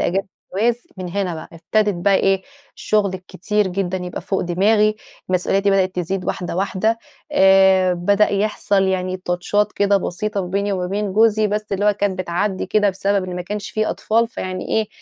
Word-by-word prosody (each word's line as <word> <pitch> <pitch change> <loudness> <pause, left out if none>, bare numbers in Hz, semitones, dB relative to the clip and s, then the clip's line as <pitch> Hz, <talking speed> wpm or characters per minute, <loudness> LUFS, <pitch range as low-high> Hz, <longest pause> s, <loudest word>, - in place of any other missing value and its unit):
أجازه 195 +2 0 0.3
الجواز 235 +4 0
من 185 -1 -5
هنا 185 -1 -2
بقى 155 - -8
ابتدت 205 +5 0
بقى 200 - +5
إيه، 195 0 +2 0.3
الشغل 205 -3 0
الكتير 190 +2 -2
جدًا 185 0 -2
يبقى 180 0 -5
فوق 195 - -2
دماغي، 210 +4 +2 0.3
مسؤولياتي 195 +2 +1
بدأت 190 -1 +2
تزيد 180 +1 -2
واحدة 175 -1 -3
واحدة، 200 +4 0 0.3
آآ 190 -4 +5
بدأ 200 +4 +2
يحصل 200 -1 +1
يعني 185 -1 -1
تاتشات 185 +3 -1
كده 200 0 +2
بسيطة 200 +2 -2
ما 180 - -4
بيني 200 +2 -1
وما 180 -1 -2
بين 200 +1 -2
جوزي، 215 0 +4
بس 210 +1 -2
اللي 200 +1 0
هو 210 - +5
كان 200 -1 -1
بتعدي 185 +2 -2
كده 210 -2 +2
بسبب 195 0 0
إن 180 - -5
ما 180 - -3
كانش 210 +3 -5
في 215 0 -1
أطفال، 230 +1 +1
فيعني 185 -6 -5
إيه 220 -1 0
195 Hz, 180 wpm, -20 LUFS, 185-210 Hz, 0.3 s, بقى